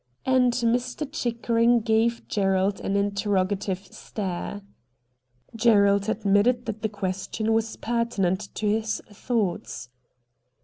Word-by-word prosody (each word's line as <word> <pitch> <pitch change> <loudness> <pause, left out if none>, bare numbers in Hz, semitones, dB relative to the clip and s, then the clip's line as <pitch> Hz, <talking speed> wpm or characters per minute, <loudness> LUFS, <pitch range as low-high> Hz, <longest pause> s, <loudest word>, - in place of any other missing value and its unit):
' 125 - -45
And 255 -1 +4
Mr. 245 +4 0
Chickering 235 -3 +2
gave 230 +1 +1
Gerald 195 -1 +1
an 195 - -1
interro 200 -1 +1
gative 195 -1 -4
stare. 200 0 -5 0.9
Gerald 200 -3 +4
admitted 220 +3 +2
that 220 -1 -5
the 220 - 0
question 200 +2 -2
was 225 0 0
pertinent 215 -5 -1
to 215 - -3
his 220 +1 0
thoughts. 205 - -2
215 Hz, 115 wpm, -25 LUFS, 200-235 Hz, 0.9 s, And